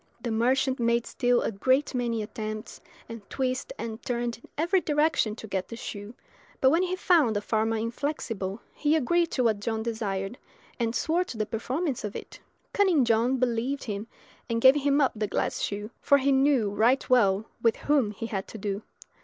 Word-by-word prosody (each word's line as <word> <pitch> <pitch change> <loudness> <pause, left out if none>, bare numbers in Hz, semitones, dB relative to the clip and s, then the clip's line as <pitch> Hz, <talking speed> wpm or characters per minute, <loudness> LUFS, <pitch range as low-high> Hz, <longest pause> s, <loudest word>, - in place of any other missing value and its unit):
The 235 - -4
merchant 260 +4 +1
made 235 0 +2
still 245 -1 +1
a - - -1
great 260 +8 +1
many 235 -3 -1
attempts, 215 0 -6 0.3
and 230 -1 -8
twisted 255 -1 -2
and 225 +1 -5
turned 240 -1 -2
in - - -17
every 350 +5 +2
direction 295 -8 +1
to 220 - -9
get 190 -2 -2
the 230 - -7
shoe; 210 0 -7 0.4
but 265 - +5
when 330 +3 +3
he 370 0 0
found 320 - +3
the - - +2
farmer 220 +1 0
inflexible, 230 -4 -3
he 300 +1 +1
agreed 335 +4 +2
to 260 -6 -1
what 220 -3 +2
John 220 +1 -2
desired, 220 0 -3 0.4
and 230 0 0
swore 335 +8 +1
to 235 - -8
the 215 - 0
performance 260 +7 -2
of 210 -1 -5
it. - - -8 0.3
Cunning 365 -10 +3
John 235 +3 +2
believed 255 +2 -1
him, 210 -1 -4 0.4
and 230 0 0
gave 260 +3 +8
him 285 0 +2
up 270 -3 +3
the 210 -1 -1
glass - - -1
shoe, 205 +2 -3
for 280 - +5
he 280 0 +2
knew 265 -6 +3
right 235 +6 +2
well 210 -5 +3 0.2
with 230 -1 +3
whom 280 -7 +1
he 210 +2 -6
had 195 -4 -4
to - - -9
do. 200 0 -3
235 Hz, 190 wpm, -27 LUFS, 220-270 Hz, 0.4 s, gave